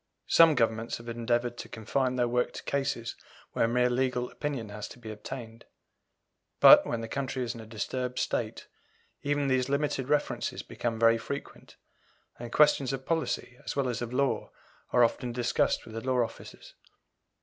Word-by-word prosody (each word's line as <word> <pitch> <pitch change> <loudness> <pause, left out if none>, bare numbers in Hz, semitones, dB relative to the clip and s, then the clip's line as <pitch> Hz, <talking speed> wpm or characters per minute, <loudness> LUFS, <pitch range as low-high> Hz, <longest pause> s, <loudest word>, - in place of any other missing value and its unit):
Some 165 -2 +6
Governments 115 -1 0
have 115 - -13
endeavoured 120 +1 -1
to - - -7
confine 125 +4 -1
their 125 -1 +2
work 125 +1 0
to - - -8
cases 135 -5 -2 0.4
where - - +2
a - - +1
mere 125 +1 +3
legal 125 0 0
opinion 135 -7 -4
has 105 0 -6
to - - -12
be 115 -3 -8
obtained; 115 +1 -8 0.9
but, - - +9
when 115 - -2
the 115 - -5
country 130 +1 -3
is 120 -1 -3
in 115 - -9
a 110 - -11
disturbed 125 +3 -3
state, - - -2 0.6
even 145 0 0
these 130 0 +1
limited 140 -2 -1
references 150 -1 0
become 115 -1 -3
very 115 0 +5
frequent, 140 +5 -7 0.6
and 120 -1 -7
questions 145 -3 +4
of 135 0 -5
policy 160 -6 -2
as - - -4
well 140 -2 +1
as 120 -1 -2
of 120 -1 -4
law 135 +1 0 0.4
are 125 - +5
often 120 +1 0
discussed 120 0 0
with 115 - -11
the 115 - -4
law 130 -1 +2
officers. 115 - -9
125 Hz, 175 wpm, -29 LUFS, 115-135 Hz, 0.9 s, but